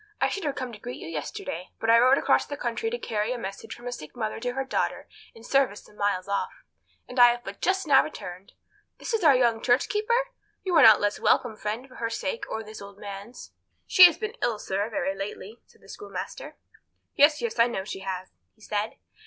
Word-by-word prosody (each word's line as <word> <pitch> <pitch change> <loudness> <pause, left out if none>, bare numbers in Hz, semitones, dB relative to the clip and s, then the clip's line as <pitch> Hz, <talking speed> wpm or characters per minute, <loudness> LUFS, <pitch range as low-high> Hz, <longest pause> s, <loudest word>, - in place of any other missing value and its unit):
I - - +2
should 395 - -4
have 285 - -1
come 255 -3 -5
to 210 - -10
greet 245 +3 -7
you - - -8
yesterday, 165 +2 -5
but 225 - +2
I 230 - +7
rode 255 +3 +5
across - - +2
the 285 - -5
country 245 - -2
to 480 - -3
carry 220 - -2
a - - -4
message 195 -4 -7
from 240 - -14
a 245 - -3
sick 155 -11 -9
mother 220 -3 -3
to 245 +1 -3
her 270 +1 -2
daughter 265 - -2 0.3
in 225 - -14
service 265 -5 +1
some - - -19
miles 200 -3 -1
off, 200 0 -3 0.4
and 250 - -4
have 240 0 +6
but 200 +1 -9
just 380 0 +1
now 275 -3 +6
returned. 185 -10 -9 0.4
This - - -5
is 440 -4 0
our 290 -4 +7
young 235 -3 +2
church 245 +2 +3
keeper? 470 +4 0 0.3
You 370 - -2
are 315 - +7
not 220 -5 +10
the - - -7
less 205 0 0
welcome, 235 -3 +2
friend, 215 +5 -4
for 255 - -15
her 230 -1 -2
sake 230 -1 -3
or 220 - -3
for - - -11
this 215 0 -10
old 200 0 -11
man's." 205 +3 -9 0.3
"She 365 - +9
has 345 -3 +5
been 435 0 -4
ill, 235 -3 0
sir, 200 +1 -2
very 190 -3 -1
lately," 200 +3 -7
said - - -25
the - - -19
schoolmaster. 415 +4 -7 0.6
"Yes, 295 +1 +5
yes; 470 - -3
I 230 - +6
know 195 -6 -3
she 195 - -6
has," 190 -1 -5 0.2
he 220 - -28
said. 210 +1 -3
230 Hz, 235 wpm, -26 LUFS, 205-270 Hz, 0.6 s, not